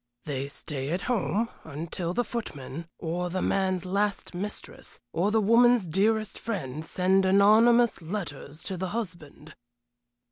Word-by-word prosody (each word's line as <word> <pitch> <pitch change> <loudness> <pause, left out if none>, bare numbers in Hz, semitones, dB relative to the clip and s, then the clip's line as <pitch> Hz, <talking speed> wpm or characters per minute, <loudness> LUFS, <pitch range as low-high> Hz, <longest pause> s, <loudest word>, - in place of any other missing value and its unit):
"They 140 -2 -3
stay 140 -1 -5
at 175 +4 -1
home 230 -2 0 0.2
until 165 +3 -4
the 245 - +2
footman, 165 - -6
or 175 +2 -2
the 185 +2 -2
man's 185 -2 +1
last 200 +2 -1
mistress, 200 +4 -7
or 180 +5 +2
the 220 +1 +3
woman's 230 +1 +5
dearest 210 +5 +1
friend, 155 - -4
send 190 +3 +2
anonymous 215 +4 +5
letters 160 -4 -6
to 190 - -4
the 185 +1 -2
husband." 160 -7 -7
185 Hz, 135 wpm, -27 LUFS, 160-210 Hz, 0.2 s, woman's